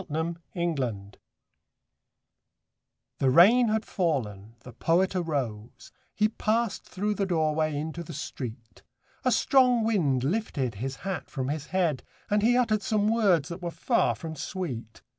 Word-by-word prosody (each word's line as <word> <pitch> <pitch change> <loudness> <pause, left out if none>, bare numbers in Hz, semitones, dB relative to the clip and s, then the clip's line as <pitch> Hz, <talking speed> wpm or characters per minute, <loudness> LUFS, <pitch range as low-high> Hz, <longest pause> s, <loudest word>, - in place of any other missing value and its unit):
THE 160 +3 -2 0.2
POET'S 170 -4 -1
HAT 100 -5 -5 2.0
The 135 - +3
rain 215 - +6
had 220 0 0
fallen, 115 - -2
the 125 - -12
Poet 180 +9 +1
arose, 130 - -3 0.2
He 215 - +3
passed 220 0 -1
through 210 +3 -2
the 200 -1 -1
doorway 155 -3 +1
into 160 +3 -4
the 170 - -9
street, 115 -6 -7 0.4
A - - +2
strong 250 -4 +4
wind 160 - +1
lifted 140 - -1
his 135 +1 -3
hat 195 -1 -3
from 130 -1 -3
his 150 0 -3
head, 170 -7 0 0.3
And 210 0 +3
he 240 +3 +4
uttered 220 -4 +2
some 210 -1 +1
words 190 -10 +3
that 170 +2 -7
were 175 - -3
far 120 -7 +1
from 160 +8 -7
sweet. 135 - -6
165 Hz, 145 wpm, -27 LUFS, 130-205 Hz, 2.0 s, rain